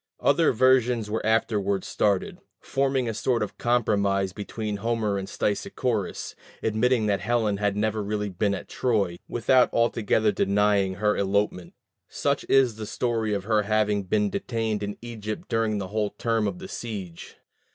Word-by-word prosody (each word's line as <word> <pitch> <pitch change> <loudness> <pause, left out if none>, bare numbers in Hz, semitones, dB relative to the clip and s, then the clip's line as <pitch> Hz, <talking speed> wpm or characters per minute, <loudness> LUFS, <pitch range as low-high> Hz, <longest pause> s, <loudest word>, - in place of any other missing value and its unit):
Other 155 +3 +3
versions 125 -3 +3
were 110 - -1
afterward 105 -3 +1
started, 100 -3 0 0.2
forming 135 -2 0
a 115 - -1
sort 120 +1 0
of 105 - -7
compromise 100 -5 +1
between 105 +1 -4
Homer 110 -2 -1
and 95 - -6
Stesichorus, 105 +1 -2 0.3
admitting 110 +1 +2
that 100 -2 +1
Helen 110 -2 0
had 105 0 0
never 110 0 0
really 105 0 -2
been 100 +2 0
at - - -8
Troy, 100 -8 0
without 125 +2 +3
altogether 110 -2 +2
denying 100 -1 +2
her 105 +2 +1
elopement. 100 -2 -1 0.3
Such - - -1
is 130 -5 +4
the 110 -1 -6
story 115 -3 -1
of 100 - -3
her 105 +1 +2
having 105 -1 +1
been 105 +2 +1
detained 110 -3 -2
in 105 0 -4
Egypt 110 -3 -6
during 115 -2 +1
the 95 -2 -4
whole 105 0 0
term 115 -1 -1
of 180 - -3
the 190 +1 -8
siege. 100 - -7
105 Hz, 155 wpm, -26 LUFS, 100-115 Hz, 0.3 s, is